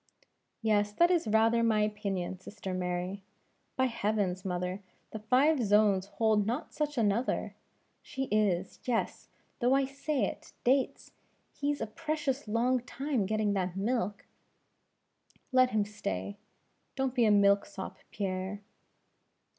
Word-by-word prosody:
"Yes, 210 -2 +2
that 345 +9 +4
is 340 -9 +2
rather 225 +2 +4
my 220 -2 +3
opinion, 195 -4 -2
sister 195 -1 -7
Mary. 180 +2 -2 0.5
By 260 - +2
heavens, 210 -6 -1
mother, 180 +1 -3 0.3
the 220 - -5
five 255 +6 +3
zones 205 -2 +3
hold 215 -1 +1
not 245 +7 -3
such 295 -2 -2
another! 225 +2 +1 0.5
She 270 - -4
is 195 -4 +1
yes 240 -3 -2 0.3
though 250 +1 +3
I 275 0 +3
say 275 -2 -1
it - - -7
Dates! 265 +2 +1 0.4
he's 290 0 -2
a - - 0
precious 285 +2 -3
long 240 +4 +2
time 250 -3 -2
getting 215 -1 +1
that 185 -2 -1
milk!" 205 -1 -1 1.3
"Let 255 -1 +5
him 215 -3 +1
stay. 205 -1 -4 0.6
Don't 265 -2 -1
be 245 -3 +3
a - - +4
milk 200 0 +4
sop, 195 -1 -7
Pierre!" 190 0 -3
215 Hz, 130 wpm, -31 LUFS, 200-255 Hz, 1.3 s, Let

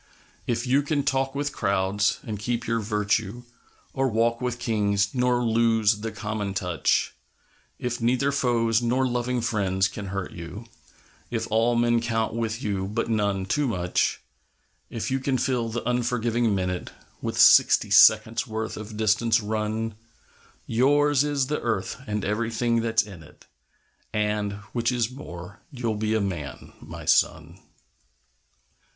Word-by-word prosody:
If 120 0 -1
you 135 +3 +3
can 145 0 -1
talk 135 0 0
with 145 +1 -2
crowds 100 0 +1
and 105 -2 -5
keep 120 +2 -2
your 115 0 0
virtue, 105 +2 -1 0.5
Or 135 0 +1
walk 115 0 +1
with 125 -1 -2
Kings 105 -4 0
nor 125 -1 +1
lose 115 -2 +2
the 110 +1 -4
common 105 -2 -4
touch; 90 -6 0 0.6
If 120 -1 -3
neither 125 +4 +2
foes 120 -4 +1
nor 125 +2 +1
loving 125 0 -1
friends 95 -4 +1
can 100 +1 -7
hurt 95 -1 -4
you, 90 +6 -8 0.6
If 115 -2 -2
all 115 +2 +3
men 120 0 +2
count 115 -1 -1
with 115 +2 -3
you, 95 -3 -2
but 115 +3 -2
none 100 -3 0
too 145 +8 0
much; 90 -6 0 0.7
If 115 +2 -4
you 135 - +1
can 130 0 0
fill 125 -2 0
the 115 +1 -4
unforgiving 120 -2 +1
minute 90 -1 -2 0.3
With - - -3
sixty - - +6
seconds' - - +5
worth 110 0 -4
of 110 0 -8
distance 110 +1 +2
run, 110 +1 -2 0.7
Yours 145 +4 +3
is 145 -2 0
the 150 +3 -2
Earth 110 0 -2
and 105 -1 -2
everything 115 +2 0
that's 115 -1 +2
in 95 -5 -11
it, 80 - -17 0.7
And 105 -1 -1 0.2
which 120 0 +1
is 120 -1 0
more 90 -8 -9
you'll 120 -6 -2
be 110 +1 -1
a 110 - +1
Man, 85 -9 -5
my - - -9
son! - - +1
115 Hz, 145 wpm, -25 LUFS, 105-120 Hz, 0.7 s, sixty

